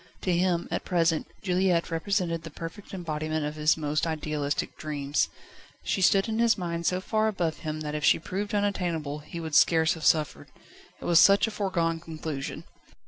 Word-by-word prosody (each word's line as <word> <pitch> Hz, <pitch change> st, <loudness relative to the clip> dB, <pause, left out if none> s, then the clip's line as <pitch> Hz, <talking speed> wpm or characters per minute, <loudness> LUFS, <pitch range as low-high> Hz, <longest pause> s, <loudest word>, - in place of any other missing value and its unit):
To 180 Hz, -2 st, +1 dB
him, 175 Hz, -1 st, +1 dB
at -, -, -2 dB
present, 165 Hz, -3 st, +1 dB, 0.2 s
Juliette 180 Hz, -3 st, +1 dB
represented 170 Hz, -1 st, -1 dB
the 165 Hz, -, -8 dB
perfect 165 Hz, +6 st, -9 dB
embodiment 155 Hz, -4 st, -3 dB
of 150 Hz, -, -3 dB
his 155 Hz, 0 st, +2 dB
most 150 Hz, +1 st, -1 dB
idealistic 150 Hz, -2 st, -2 dB
dreams. 145 Hz, -2 st, -1 dB, 0.5 s
She 190 Hz, -, -1 dB
stood 195 Hz, +2 st, +4 dB
in 220 Hz, 0 st, -2 dB
his 230 Hz, -1 st, +4 dB
mind 170 Hz, -2 st, -3 dB
so 180 Hz, -, +1 dB
far 215 Hz, +2 st, +1 dB
above 175 Hz, -7 st, -1 dB
him 155 Hz, -1 st, -4 dB
that 150 Hz, -1 st, -4 dB
if 150 Hz, 0 st, -3 dB
she -, -, +5 dB
proved 200 Hz, +5 st, -4 dB
unattainable, 175 Hz, -8 st, -1 dB
he 160 Hz, +3 st, -8 dB
would 160 Hz, -2 st, -6 dB
scarce 160 Hz, +1 st, +5 dB
have 160 Hz, -, -9 dB
suffered. 155 Hz, -2 st, +2 dB, 0.5 s
It -, -, -9 dB
was 170 Hz, -1 st, +5 dB
such 200 Hz, 0 st, +6 dB
a 225 Hz, -, -4 dB
foregone 170 Hz, -6 st, -1 dB
conclusion. 155 Hz, -4 st, -6 dB
165 Hz, 180 wpm, -27 LUFS, 155-185 Hz, 0.5 s, such